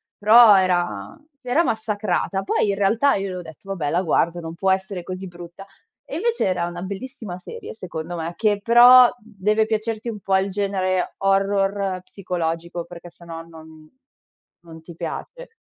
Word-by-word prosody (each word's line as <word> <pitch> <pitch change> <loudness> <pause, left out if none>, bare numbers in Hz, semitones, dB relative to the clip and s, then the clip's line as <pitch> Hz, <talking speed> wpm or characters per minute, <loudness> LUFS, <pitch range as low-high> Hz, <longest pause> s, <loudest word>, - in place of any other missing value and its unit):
però 215 +1 +7
era 175 - 0 0.2
era 260 +7 +1
massacrata. 210 - -1
Poi 205 - 0
in 200 - +1
realtà 220 +8 +2
io 195 0 -3
le 185 - -5
ho 180 - -5
detto. 165 +4 -13
"Vabbè 155 -6 -2
la 180 +4 0
guardo, 170 +1 +1
non 165 -1 -7
può 190 +3 -1
essere 190 -1 -2
così 185 +2 -7
brutta" 175 +2 -11 0.4
e - - -7
invece 465 +5 0
era 180 -2 0
una 175 0 -6
bellissima 200 -1 -7
serie 465 - -9
secondo 175 -4 -6
me, 165 +1 -5
che 205 -2 +1
però 245 +2 +8
deve 215 -1 0
piacerti 220 +1 -3
un 210 -3 -6
po' 190 0 +1
il 195 +1 -1
genere 190 -2 -1
horror 195 -1 0
psicologico, 170 -2 -4
perché 175 0 -11
se 170 0 -18
no 165 -1 -7
non 160 -1 -14 0.8
non 160 -1 -12
ti 170 - -12
piace. - - -7
190 Hz, 170 wpm, -22 LUFS, 175-215 Hz, 0.8 s, però